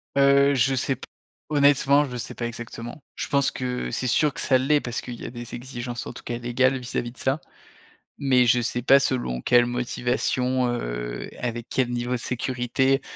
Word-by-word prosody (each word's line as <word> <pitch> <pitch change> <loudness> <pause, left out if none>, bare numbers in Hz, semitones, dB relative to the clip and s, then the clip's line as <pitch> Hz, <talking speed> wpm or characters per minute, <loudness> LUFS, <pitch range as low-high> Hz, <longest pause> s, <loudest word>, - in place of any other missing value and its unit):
Heu, 140 0 +5
je 135 +1 +3
sais 130 +1 0
p - - -11 0.4
honnêtement, 145 -1 +4
je 125 -3 -6
sais 120 - -5
pas 120 - -3
exactement. 120 +3 -8
Je - - -4
pense 140 -1 +2
que, 125 - -3
c'est 130 - -2
sûr 150 +4 +3
que 165 - -7
ça 130 - +3
l'est 145 +3 +2
parce 120 -1 -4
qu'il 120 -2 -8
y - - -6
a - - -4
des 120 -1 -7
exigences, 120 -1 -6
en - - -6
tout - - -11
cas, 120 - -3
légales 130 +2 +1
vis-à-vis 120 -1 -3
de 125 - -20
ça, 135 +3 0 0.8
mais 130 -3 +3
je 120 +1 +4
sais 120 +1 -1
pas 135 +3 +6
selon 120 - -1
quelle 120 - +5
motivation, 125 +1 0
heu, - - -3
et - - -15
avec 120 -1 -4
quel 130 -2 +1
niveau 120 0 -2
de - - +1
sécurité. 125 +2 0
125 Hz, 200 wpm, -25 LUFS, 120-135 Hz, 0.8 s, pas